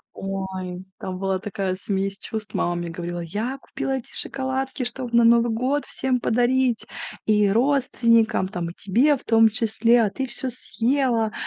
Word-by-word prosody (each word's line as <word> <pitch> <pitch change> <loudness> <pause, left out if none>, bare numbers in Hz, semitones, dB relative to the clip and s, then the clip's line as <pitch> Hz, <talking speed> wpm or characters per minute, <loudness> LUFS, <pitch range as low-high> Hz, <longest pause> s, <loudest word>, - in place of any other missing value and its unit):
Ой! 190 -1 -5
Там 185 -1 -5
была 190 0 -1
такая 195 -2 -3
смесь 195 +1 -2
чувств! 220 -1 -5
Мама 175 - 0
мне 175 0 -3
говорила: 175 +1 -5
"Я 210 +10 -3
купила 270 0 -3
эти 250 - -10
шоколадки, 265 0 -2
чтобы 245 -1 -4
на 235 - +6
Новый 235 0 +5
год 255 +6 0
всем 260 -1 -1
подарить! 245 +1 +1 0.4
И 210 -2 +3
родственникам, 230 -4 +3
там, 175 -4 -4
и - - -8
тебе 250 +12 +2
в - - -17
том 225 -1 +5
числе, 230 +1 +3
а 210 - +1
ты 265 -1 -3
всё 255 +2 -2
съела, 240 -2 0
225 Hz, 160 wpm, -23 LUFS, 195-255 Hz, 0.4 s, на